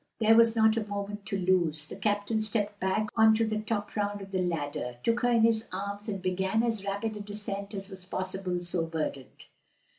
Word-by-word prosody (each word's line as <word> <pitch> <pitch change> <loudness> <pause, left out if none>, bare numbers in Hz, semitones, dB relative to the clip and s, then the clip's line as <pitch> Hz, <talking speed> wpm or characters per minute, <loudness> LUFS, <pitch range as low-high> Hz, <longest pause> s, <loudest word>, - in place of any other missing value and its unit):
There 220 0 +5
was 230 0 +6
not 220 0 +4
a 215 -2 -1
moment 205 0 -5
to 200 -2 -1
lose. 175 -5 +1
The - - -8
captain 210 +1 0
stepped 210 -1 -1
back 200 +3 0
on 220 -1 +6
to 225 +1 +2
the 215 -1 -1
top 215 -1 -3
round 205 -1 -1
of 195 0 -9
the 185 -1 0
ladder, 145 -7 -2
took 230 +1 +2
her 245 - +2
in 230 -2 +4
his 225 -1 +3
arms, 200 +3 -4
and 195 -2 -2
began 190 +4 0
as 225 -4 -1
rapid 200 +2 -2
a - - -7
descent 205 0 -4
as 195 0 -5
was 190 -2 -9
possible 185 -1 -3
so 175 -1 -1
burdened. 155 -5 -5
205 Hz, 210 wpm, -29 LUFS, 185-220 Hz, -, was